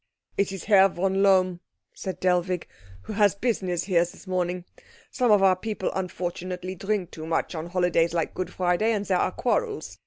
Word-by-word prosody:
"It 200 -1 +1
is 195 - -6
Herr 195 -2 +6
von 190 +2 0
Lohm," 185 -3 +4 0.3
said 190 - -6
Dellwig, 180 -1 +1 0.4
"who - - -6
has 205 -2 +3
business 190 -6 -1
here 180 -3 +2
this 175 - -10
morning. 180 -1 -2 0.5
Some 250 -2 +1
of 205 -2 +5
our 190 -1 +6
people 205 0 -3
unfortunately 180 0 -4
drink 195 -1 -2
too 155 0 -8
much 165 +2 -1
on 160 0 -5
holidays 175 -2 +2
like 165 -1 -1
Good 185 - -4
Friday, 185 +5 +1
and 205 -1 -2
there 185 -2 +1
are - - +1
quarrels. 455 -4 -2
185 Hz, 180 wpm, -26 LUFS, 180-200 Hz, 0.5 s, Herr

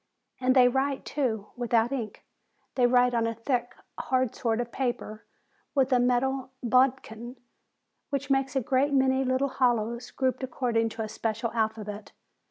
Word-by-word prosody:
And 255 0 +2
they 250 -1 +7
write, 270 +2 0
too, 225 -8 -2
without 240 -1 +1
ink. 240 -6 -5 0.5
They 245 -2 +3
write 245 0 +4
on 230 -1 +1
a 230 - -3
thick, 245 +1 -2 0.2
hard 255 -2 0
sort 230 -3 -1
of 240 -1 -3
paper 240 -4 -3 0.5
with 270 -1 +3
a 250 - +5
metal 255 +2 +1
bodkin, 250 -1 +1 0.7
which 280 0 -2
makes 270 0 +1
a 265 - +2
great 270 +4 +1
many 265 0 +3
little 260 +2 +1
hollows, 235 -2 0
grouped 260 -1 -1
according 240 -3 0
to 225 0 -5
a - - -4
special 225 +2 -3
alphabet. 215 -2 -3
245 Hz, 155 wpm, -27 LUFS, 230-265 Hz, 0.7 s, they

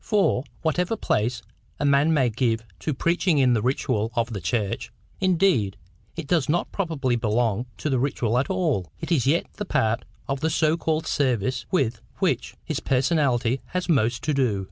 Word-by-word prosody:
For, 200 - +2 0.2
whatever 180 +7 0
place 115 - 0 0.4
a 145 - 0
man 140 +3 +4
may 135 -6 +3
give 115 -1 0 0.2
to 125 - -2
preaching 170 +3 +1
in 130 -3 +4
the 110 - +1
ritual 120 -3 0
of 115 0 0
the 100 - -4
church—indeed 115 - 0 0.4
it 165 - -5
does 155 0 +1
not 175 +3 0
properly 155 -10 -1
belong 115 0 0
to - - -3
the 135 -4 +1
ritual 125 -3 +1
at 135 - -1
all—it 165 - -2
is 135 -6 +2
yet 160 +5 +3
the 210 - -3
part 115 - +1 0.2
of 135 0 -1
the 160 - 0
so 155 0 +2
called 160 -1 -1
service 125 -4 0
with 120 -10 0 0.2
which - - 0
his - - -2
personality 130 -3 +1
has 180 0 -3
most 120 -8 +1
to 155 - 0
do. 125 -8 +1
130 Hz, 170 wpm, -24 LUFS, 115-160 Hz, 0.4 s, man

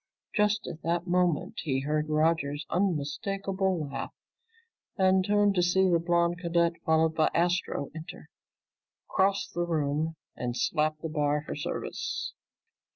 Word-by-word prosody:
Just 210 -1 +2
at 160 - -7
that 170 +1 -1
moment 180 -3 +1
he 135 -4 0
heard 150 +2 -1
Roger's 155 -2 +1
unmistakable 190 +1 -1
laugh 140 - -5 0.9
and 190 -1 +4
turned 205 0 +3
to 180 - +2
see 190 +2 +3
the 170 -2 +3
blond 170 +1 +1
cadet, 170 -1 +2
followed 160 0 +3
by 160 -1 +3
Astro, 175 -4 0
enter, 160 0 -9 0.8
cross 195 +1 +2
the 175 - -4
room, 160 -1 0 0.2
and 125 0 -3
slap 155 -1 +1
the 165 - -3
bar 150 -1 0
for - - -4
service. - - -4
170 Hz, 135 wpm, -29 LUFS, 155-185 Hz, 0.9 s, and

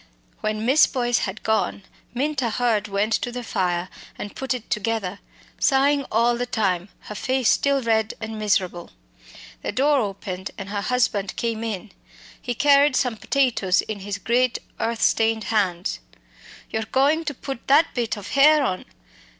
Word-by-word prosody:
When 215 0 -2
Miss 270 +5 +6
Boyce 240 -3 0
had 200 +3 -9
gone, 220 -2 0 0.3
Minta 265 -1 -1
Hurd 225 -3 0
went 205 +2 0
to 245 - -1
the 245 0 -5
fire 180 -5 -1 0.3
and 205 - -7
put 265 -1 -2
it 240 - -8
together, 210 -2 -1 0.4
sighing 280 0 +3
all 235 +2 +3
the 245 +1 -3
time, 195 -5 0
her - - -8
face 255 +2 0
still 280 -1 +2
red 220 -1 +1
and 220 0 -5
miserable. 190 -4 0 0.7
The - - -3
door 285 +2 +3
opened 190 -3 -4
and 195 0 -7
her 205 0 -2
husband 215 -6 0
came 230 -1 -2
in. 215 -2 -4 0.5
He 245 -2 -3
carried 285 0 +5
some 250 -4 +1
potatoes 225 -7 +1
in 215 -2 -5
his 200 +1 -4
great 245 +4 +1 0.2
earth 230 0 -1
stained 225 -1 +2
hands. 185 -4 0 0.7
"You're 220 0 -2
goin' 285 +7 +2
to 290 - -3
put 270 -1 -7
that 295 +4 +4
bit 230 -3 -1
of 205 -1 -8
hare 295 +2 +5
on? 185 -8 -2
225 Hz, 160 wpm, -23 LUFS, 205-260 Hz, 0.7 s, Miss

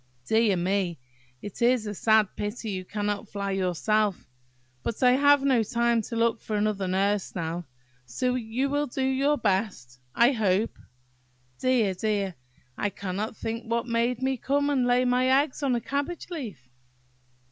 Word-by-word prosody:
Dear 220 - +3
me! 180 -1 0 0.5
it 205 - -8
is 240 -1 +3
a 210 - -3
sad 220 0 +3
pity 210 +1 -4
you 185 -1 -4
cannot 205 +2 -3
fly 200 -1 -3
yourself. 195 +2 0 0.6
But 230 - -3
I 250 - +7
have 285 +2 +5
no 265 -4 +3
time 235 +1 +1
to 230 - -6
look 230 0 +1
for 215 - -4
another 205 -2 0
nurse 195 +2 0
now, 170 0 -3 0.4
so 250 - -1
you 250 +2 -1
will 290 0 0
do 265 +2 -3
your 270 +3 +2
best, 190 - -1 0.2
I 235 +3 +5
hope. 215 -3 0 0.8
Dear! 245 -7 +2
dear! 200 -1 -1 0.5
I 205 - +1
cannot 200 +3 -4
think 230 +1 -5
what 235 0 0
made 235 +1 0
me 265 0 +1
come 285 +4 0
and 255 -3 +2
lay 245 +1 +3
my 250 +1 +2 0.2
eggs 295 0 -9
on 270 -3 +1
a - - +1
cabbage 285 +8 -4
leaf! 210 - -7
225 Hz, 160 wpm, -27 LUFS, 200-250 Hz, 0.8 s, I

